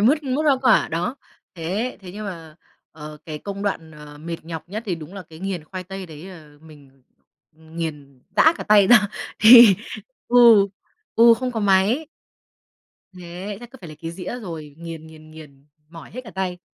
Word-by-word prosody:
mứt, 280 +9 +3
mứt 275 +2 -1
hoa 285 -3 +4
quả, 230 -4 +4
đó. 175 - -3 0.4
Thế 190 +9 -3
thế 185 -2 -11
nhưng 210 +2 -7
mà, 165 -4 -9 0.4
ờ, 150 -1 -10
cái 155 -2 -7
công 200 +2 -7
đoạn, 165 -6 -3
ờ, 150 -1 -13
mệt 165 +2 -6
nhọc 165 0 -8
nhất 210 +4 -5
thì 185 - -1
đúng 165 +3 -11
là 195 - -7
cái 160 -2 -15
nghiền 185 -4 -4
khoai 185 +2 -8
tây 190 0 -8
đấy 155 +1 -11
là 155 -6 -13
mình 140 -4 -18 0.5
nghiền 155 -4 -8
rã 320 - +6
cả - - -7
tay 210 -2 +5
ra, 215 -3 +6 0.3
thì 225 -3 +9 0.5
ừ, 235 -5 +7 0.5
ừ, 230 0 +7
không 250 +1 -4
có 225 - -3
máy. 205 +9 +2 1.1
Thế 180 +4 -7
chắc 240 - -12
cứ 265 - -13
phải 170 - -10
lấy 155 - -11
cái 165 - -4
dĩa 185 +8 -6
rồi, 160 -8 -8
nghiền, 165 -1 -9
nghiền, 155 0 -15
nghiền, 145 -3 -15 0.2
mỏi 165 0 -12
hết 255 - -7
cả 220 - -10
tay. 185 -2 -4
180 Hz, 190 wpm, -22 LUFS, 160-210 Hz, 1.1 s, thì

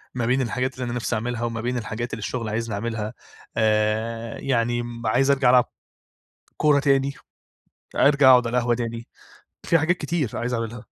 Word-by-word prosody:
ما 120 - -1
بين 130 +3 +2
الحاجات 130 +1 -1
اللي 130 - -5
أنا 120 - -4
نفسي 120 -1 -2
أعملها، 120 +1 -3
وما 115 -1 -2
بين 125 +1 -2
الحاجات 115 +1 -4
اللي 110 - -4
الشغل 115 +1 -3
عايزني 115 0 -2
أعملها، 110 +1 -3 0.4
آآ، 110 +1 0
يعني 120 -2 0 0.2
عايز 135 +6 +3
أرجَع 135 -3 +3
ألعب 125 -1 +5 0.9
كورة 150 -2 +4
تاني، 140 -1 +2 0.8
أرجَع 140 -2 +5
أقعد 125 -2 +6
على 120 +2 -1
القهوة 120 0 +2
تاني، 115 0 -4 0.6
في 165 - +4
حاجات 170 +3 +1
كتير 150 -5 -1
عايز 125 +1 -2
أعملها. 115 -1 -4
120 Hz, 170 wpm, -23 LUFS, 115-130 Hz, 0.9 s, أقعد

